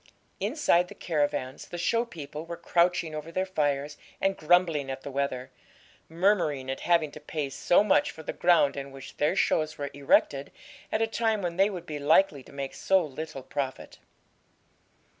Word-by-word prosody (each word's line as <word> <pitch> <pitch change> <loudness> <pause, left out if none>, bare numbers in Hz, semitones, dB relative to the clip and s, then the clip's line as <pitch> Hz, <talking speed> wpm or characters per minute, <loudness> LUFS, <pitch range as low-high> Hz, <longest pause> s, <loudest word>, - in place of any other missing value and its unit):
Inside 205 - +2
the - - -11
caravans 145 -5 -2
the 175 - -7
show 230 +7 +1
people 155 -7 -8
were 170 0 -7
crouching 170 -1 +1
over 155 +2 -6
their 185 +2 0
fires 145 -5 -1 0.2
and 195 0 +1
grumbling 165 -4 +2
at 135 0 -5
the 140 - -6
weather, 130 -1 -2 0.6
murmuring 160 -7 +1
at 135 - -4
having 165 -4 +2
to 150 - -10
pay 150 -2 -4
so 175 +8 +3
much 210 - +3
for 160 - -10
the - - -4
ground 170 -5 +4
on 140 0 -5
which 135 -1 -11
their 150 - +2
shows 155 -1 +1
were 140 -1 -4
erected, 140 0 +2 0.4
at 220 - +1
a - - +4
time 225 -2 0
when 170 -1 -2
they 195 +2 +4
would 180 -4 -6
be 150 -3 -5
likely 155 0 +3
to - - -16
make 140 -1 -5
so 190 -3 +2
little 150 -1 -7
profit. 135 0 -5
155 Hz, 180 wpm, -28 LUFS, 140-180 Hz, 0.6 s, ground